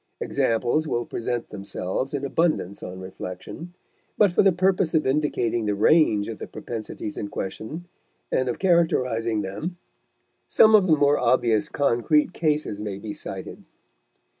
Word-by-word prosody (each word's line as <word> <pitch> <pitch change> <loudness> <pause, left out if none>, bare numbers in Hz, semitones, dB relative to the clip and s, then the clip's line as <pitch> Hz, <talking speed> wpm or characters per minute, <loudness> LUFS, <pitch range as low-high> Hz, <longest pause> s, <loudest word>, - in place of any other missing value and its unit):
Examples 120 +7 0
will 120 -4 -1
present 120 0 -3
themselves 100 +6 -4
in 140 0 -3
abundance 140 - 0
on 90 +1 -7
reflection, 95 - -8 0.4
but 205 -3 +5
for - - +4
the 195 - +5
purpose 180 -2 +1
of 155 - +2
indicating 125 -5 0
the 105 - +1
range 105 -2 +4
of 115 - -6
the - - -6
propensities 110 -2 -6
in 100 - -3
question 110 - -6 0.5
and 130 -1 +1
of 120 - -2
characterizing 125 - +1
them, 150 - -5 0.7
some 220 - +5
of 205 -3 +6
the 155 -3 +4
more 145 0 +3
obvious 120 -3 +2
concrete 145 +5 +2
cases 150 -10 -1
may 105 -2 -4
be 105 +1 -6
cited. - - -8
125 Hz, 145 wpm, -24 LUFS, 105-160 Hz, 0.7 s, of